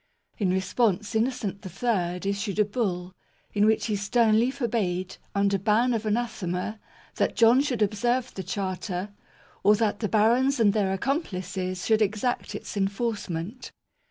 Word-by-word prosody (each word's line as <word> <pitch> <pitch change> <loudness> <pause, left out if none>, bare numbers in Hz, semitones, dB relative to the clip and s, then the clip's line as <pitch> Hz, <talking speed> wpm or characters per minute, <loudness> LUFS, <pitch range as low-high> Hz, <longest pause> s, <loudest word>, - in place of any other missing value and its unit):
In 195 -4 +1
response, 195 +2 +1
Innocent 220 -3 -1
III 185 -2 -1
issued 200 0 -2
a 210 - +4
Bull, 185 -5 -2 0.4
in 210 0 +3
which 220 - +2
he 215 - 0
sternly 220 +3 +3
for 260 -2 -2
bade, 185 -5 -2 0.2
under 200 0 +2
ban 225 +6 +2
of 220 -1 -2
anathema, 215 -3 -2 0.4
that - - +1
John 235 +3 +6
should 250 -7 0
ob 205 - 0
serve 245 +4 0
the 190 - -5
Charter, 190 0 -3 0.5
or 210 - +5
that 210 -1 0
the 210 - -1
barons 240 +5 +3
and 205 -3 +4
their 200 -3 +1
"accomplices" 185 - -2
should 220 -1 +3
exact 215 +4 -1
its - - -7
enforcement. 200 0 -3
210 Hz, 150 wpm, -26 LUFS, 190-230 Hz, 0.5 s, John